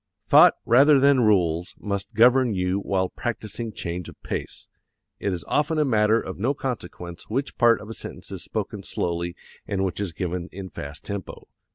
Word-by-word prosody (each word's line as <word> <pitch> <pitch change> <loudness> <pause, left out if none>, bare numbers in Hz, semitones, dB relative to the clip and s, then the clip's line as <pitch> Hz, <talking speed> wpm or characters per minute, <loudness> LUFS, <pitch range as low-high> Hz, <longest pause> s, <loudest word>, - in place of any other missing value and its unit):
Thought - - +7
rather 140 +4 +6
than 140 -1 +5
rules 90 -5 +2
must 100 -1 -4
govern 125 0 +5
you 90 +1 0
while 95 -2 0
practising 115 -1 -4
change 85 -3 -5
of - - -15
pace. - - -5 0.5
It 100 - -1
is 90 -2 -4
often 155 +2 +1
a 150 - +3
matter 110 -3 +3
of 95 - -7
no 130 +7 +1
consequence 90 -9 -6
which 135 +6 -2
part 120 -1 +5
of 105 - -10
a 115 - -6
sentence - - -7
is - - -6
spoken - - -4
slowly 85 0 -3 0.3
and 95 -1 0
which 95 0 -3
is 100 -4 -2
given 90 +1 -4
in 95 0 -8
fast 70 +2 -8
tempo. 100 -3 -6
100 Hz, 180 wpm, -24 LUFS, 90-120 Hz, 0.5 s, Thought